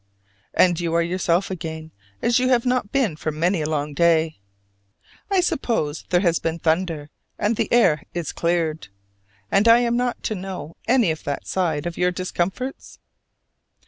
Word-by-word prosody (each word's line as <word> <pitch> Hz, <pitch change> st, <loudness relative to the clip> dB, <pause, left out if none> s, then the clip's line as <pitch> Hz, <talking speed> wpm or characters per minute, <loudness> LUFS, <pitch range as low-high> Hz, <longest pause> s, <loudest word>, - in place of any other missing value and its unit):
And 175 Hz, -2 st, +4 dB
you 170 Hz, -1 st, -1 dB
are 170 Hz, -, +4 dB
yourself 180 Hz, +2 st, 0 dB
again, 160 Hz, -3 st, -6 dB, 0.3 s
as 240 Hz, +1 st, +3 dB
you 255 Hz, 0 st, +1 dB
have 245 Hz, -2 st, +3 dB
not 250 Hz, -4 st, 0 dB
been 240 Hz, -, +1 dB
for 155 Hz, -, -3 dB
many 170 Hz, +3 st, 0 dB
a 150 Hz, -, -2 dB
long 150 Hz, -1 st, -2 dB
day. 160 Hz, -3 st, +2 dB, 0.9 s
I 390 Hz, -2 st, +3 dB
suppose 195 Hz, -, -1 dB
there 175 Hz, -1 st, +3 dB
has 170 Hz, -4 st, +2 dB
been 165 Hz, 0 st, -2 dB
thunder, 160 Hz, -2 st, -1 dB, 0.3 s
and 210 Hz, +2 st, +1 dB
the -, -, -2 dB
air 170 Hz, -11 st, +4 dB
is 170 Hz, -4 st, -3 dB
cleared: 165 Hz, -4 st, -1 dB, 0.6 s
and 200 Hz, +3 st, +4 dB
I 230 Hz, +1 st, +8 dB
am 235 Hz, -1 st, +1 dB
not 245 Hz, 0 st, -1 dB
to -, -, -1 dB
know 185 Hz, -5 st, -6 dB
any 240 Hz, -8 st, +4 dB
of 155 Hz, -, -6 dB
that 145 Hz, -, -3 dB
side 165 Hz, -5 st, -1 dB
of 175 Hz, -1 st, -4 dB
your 180 Hz, 0 st, +3 dB
discomforts? 185 Hz, +8 st, -4 dB
175 Hz, 170 wpm, -23 LUFS, 160-215 Hz, 0.9 s, I